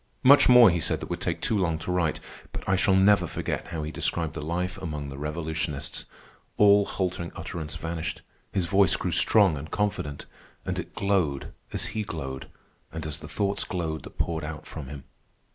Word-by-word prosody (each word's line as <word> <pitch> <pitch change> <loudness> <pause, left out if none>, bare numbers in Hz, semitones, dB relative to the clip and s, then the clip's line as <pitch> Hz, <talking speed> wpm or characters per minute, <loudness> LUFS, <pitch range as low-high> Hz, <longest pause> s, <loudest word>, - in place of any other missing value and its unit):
Much 140 +1 +7
more 125 -5 +9
he 85 - 0
said - - 0
that - - -7
would - - -3
take - - -2
too - - +1
long 85 -5 +1
to 80 +3 -4
write, 85 -4 +1 0.3
but - - -7
I 95 - +3
shall 95 +1 +3
never 100 +2 +5
forget - - -3
how 80 -2 -4
he 75 - -4
described 80 -1 -1
the 80 - -5
life 90 +4 -2
among 75 -6 -4
the 70 - -8
revolutionists. 75 -1 -3 0.5
All 100 0 +6
halting 90 -3 -3
utterance 80 -3 -5
vanished. 80 0 -4 0.3
His 95 -3 0
voice 95 +1 +4
grew - - -2
strong 100 -8 +4
and 75 +3 -7
confident, 100 -9 -2 0.4
and - - -2
it - - -7
glowed 90 -9 0 0.2
as - - -1
he 110 - -1
glowed, 70 -9 -5 0.4
and 80 -1 -5
as 75 0 -3
the 75 - -9
thoughts 100 +6 -1
glowed 80 -4 -3
that - - -12
poured 80 -2 -1
out 75 0 -6
from 75 -5 -7
him. 70 0 -8
85 Hz, 195 wpm, -27 LUFS, 75-95 Hz, 0.5 s, more